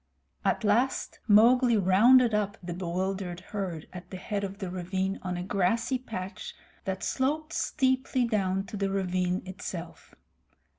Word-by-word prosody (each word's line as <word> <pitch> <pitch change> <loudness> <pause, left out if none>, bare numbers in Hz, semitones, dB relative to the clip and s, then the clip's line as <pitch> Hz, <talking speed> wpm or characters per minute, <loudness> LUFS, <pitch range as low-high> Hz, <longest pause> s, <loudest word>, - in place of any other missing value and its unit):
At - - +1
last 235 +6 +1
Mowgli 235 +3 +6
rounded 225 +6 +5
up 210 0 0
the 175 0 -4
bewildered 180 +1 -3
herd 185 -6 -4
at 180 0 -9
the 185 - -6
head 200 +2 -3
of 195 0 -4
the 190 -3 -5
ravine 190 +1 -2
on 180 -1 -3
a 175 - -3
grassy 225 +7 +1
patch 195 -6 -6 0.3
that 190 -1 -3
sloped 305 +4 -1
steeply 260 -2 +1
down 195 -4 0
to 210 +1 -7
the 195 0 0
ravine 185 -1 0
itself. 180 -2 -8
195 Hz, 145 wpm, -28 LUFS, 185-230 Hz, 0.3 s, Mowgli